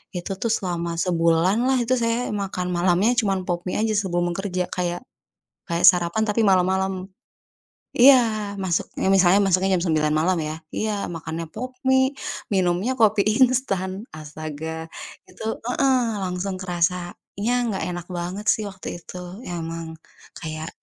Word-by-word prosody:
Itu 180 +2 -4
tuh 230 - 0
selama 170 -5 -2
sebulan 170 +2 +2
lah 265 - +3
itu 255 +2 +1
saya 230 +1 0
makan 190 -2 -3
malamnya 180 +6 +3
cuman 195 -4 0
Pop 175 -1 -2
Mie 180 - -1
aja 220 -1 +1
sebelum 175 -3 0
kerja. 185 -2 -2
Kayak 175 -1 -2 0.7
kayak 170 +1 -1
sarapan 180 +3 +3
tapi 210 +2 +2
malam-malam. 190 0 +2 0.9
Iya 265 +3 +9 0.5
masuk 175 -3 0
nih 190 - +1
misalnya 190 0 +5
masuknya 190 +1 +2
jam 170 - -2
9.00 155 -1 +2
malam 170 +3 +2
ya. 155 0 -3 0.2
Iya 215 -1 -1 0.2
makannya 165 +1 -5
Pop 255 +4 -5 0.2
Mie, 265 +1 +4 0.4
minumnya 185 +6 +1
kopi 215 -2 +4 0.2
instan. 220 -8 -1 0.3
Astaga. 155 +1 -6 0.4
Itu - - -11 0.2
heeh, 260 +1 +3 0.3
langsung 185 +1 -3
kerasanya 175 0 -1 0.5
nggak 200 -4 -2
enak 175 -1 -5
banget 180 +5 -4
sih 215 - -3
waktu 190 -1 -10
itu. 180 - -10 0.3
Emang 165 -1 -5 0.4
kayak 155 0 -5
180 Hz, 140 wpm, -23 LUFS, 170-205 Hz, 0.9 s, Iya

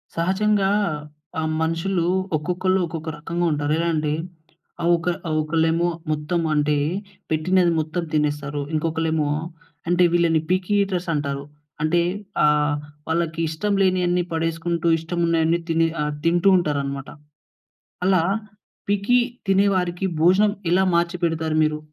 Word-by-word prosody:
సహజంగా 195 +3 +2 0.7
ఆహ్, 160 0 -1
మనుషులు 165 +2 0 0.3
ఒక్కొక్కళ్ళు 180 +4 0
ఒక్కొక్క 160 -1 -5
రకంగా 170 +3 -2
ఉంటారు. 145 0 0
ఎలా 170 - 0
అంటే 150 -1 0 0.7
ఆహ్, 170 - +1
ఒక 170 +1 -2 0.2
ఆహ్, 155 - -1
ఒకళ్ళేమో 165 +2 +1 0.2
మొత్తం 155 +3 -1
అంటే 150 0 +2 0.5
పెట్టినది 175 +3 +3
మొత్తం 160 +3 -2
తినేస్తారు. 145 -1 -1
ఇంకొకళ్ళేమో 160 -1 0 0.6
అంటే 175 +1 +4
వీళ్ళని 170 -2 +3
పిక్కీ 185 +2 0
ఈటర్స్ 185 -3 -3
అంటారు. 140 -2 -2 0.4
అంటే 170 +2 +3 0.4
ఆహ్, 150 -1 +3 0.3
వాళ్ళకి 165 0 -1
ఇష్టం 200 +6 -1
లేనియన్నీ 180 -2 +2
పడేసుకుంటూ, 165 +1 -1
ఇష్టం 170 +2 -4
ఉన్నయన్నీ 165 0 +2
తిని 165 0 +3 0.2
ఆహ్, 150 0 -2
తింటూ 175 +3 +4
ఉంటారనమాట. 140 -4 -2 1.0
అలా 185 -3 +4 0.7
పిక్కీ 205 +5 +3 0.3
తినే 195 +1 +4
వారికి 180 0 -1 0.2
భోజనం 195 +5 +4 0.2
ఎలా 185 +2 +4
మార్చిపెడతారు 170 -2 0
మీరు? 155 0 0
165 Hz, 120 wpm, -22 LUFS, 155-180 Hz, 1.0 s, అంటే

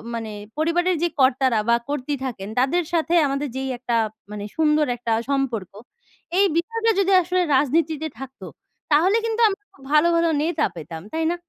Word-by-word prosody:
মানে 225 -2 -5 0.3
পরিবারের 350 +3 +1
যে - - +4
কর্তারা 260 -3 +3
বা 235 - +6
কর্ত্রী 285 0 -2
থাকেন, 210 -5 -5
তাদের 335 +7 +2
সাথে 335 +1 +1
আমাদের 275 +1 -2
যেই 265 0 -3
একটা 240 -1 -2 0.4
মানে 205 -1 -6
সুন্দর 305 -1 +3
একটা 230 -1 -3 0.2
সম্পর্ক, 240 -9 -1 0.7
এই 400 - +5
বিষয়টা 455 +6 +1
যদি 390 0 +2
আসলে 360 +1 0
রাজনীতিতে 310 +3 +1
থাকতো, 270 0 -9 0.5
তাহলে 365 +9 +4
কিন্তু 455 +1 -1
আমরা 395 +1 -5
খুব 270 - -19
ভালো 305 +3 +5
ভালো 335 0 +3
নেতা 320 -1 +1
পেতাম। 160 0 -8
তাই 320 0 0
না? - - -1
300 Hz, 165 wpm, -22 LUFS, 260-340 Hz, 0.7 s, বা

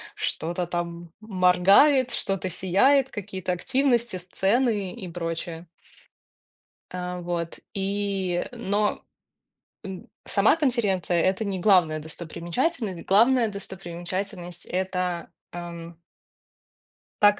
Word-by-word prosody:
что-то 175 +2 -2
там 170 -1 -4
моргает, 205 +7 +4
что-то 195 -1 -1
сияет, 200 - +3
какие-то 190 -4 -4
активности, 240 +3 +1
сцены 195 +3 0
и 195 -7 -6
прочее. 165 0 -4 1.2
А 180 0 -4
вот 170 -1 -3
и, 195 -2 -1
но, 210 -3 0 0.8
м, 190 -2 -8 0.2
сама 205 +7 +4
конференция- 200 - +1
это 190 +5 +1
не 195 -2 -2
главная 175 -5 +4
достопримечательность. 170 - -3
Главная 230 +4 +4
достопримечательность- 185 -2 -6
это, 180 -2 -2 0.2
ам 170 -1 -7 1.3
так 205 0 +6
185 Hz, 90 wpm, -25 LUFS, 175-210 Hz, 1.3 s, так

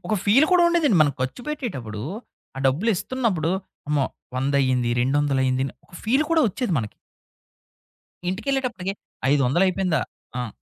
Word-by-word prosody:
ఒక 215 - +1
ఫీల్ 260 +10 +5
కూడా 355 -1 +6
ఉండేదండి. 310 - +3
మనం 145 -2 +2
ఖర్చు 130 - -2
పెట్టేటప్పుడు 130 - -4 0.5
ఆ - - -4
డబ్బులిస్తున్నప్పుడు 190 - 0 0.4
అమ్మో! 145 -3 +2 0.3
వందయింది, 130 -2 +1
రెండొందలైంది 130 -1 +1
అని 135 - -4
ఒక - - -28
ఫీల్ 260 +7 +3
కూడా 325 -1 +4
ఒచ్చేది 240 +1 -2
మనకి. 110 -2 -4 1.4
ఇంటికెళ్ళేటప్పటికి 240 -4 -2 0.4
ఐదొందలయిపోయిందా? 175 +5 +2 0.4
ఆ! 115 - -4
175 Hz, 120 wpm, -24 LUFS, -, 1.4 s, కూడా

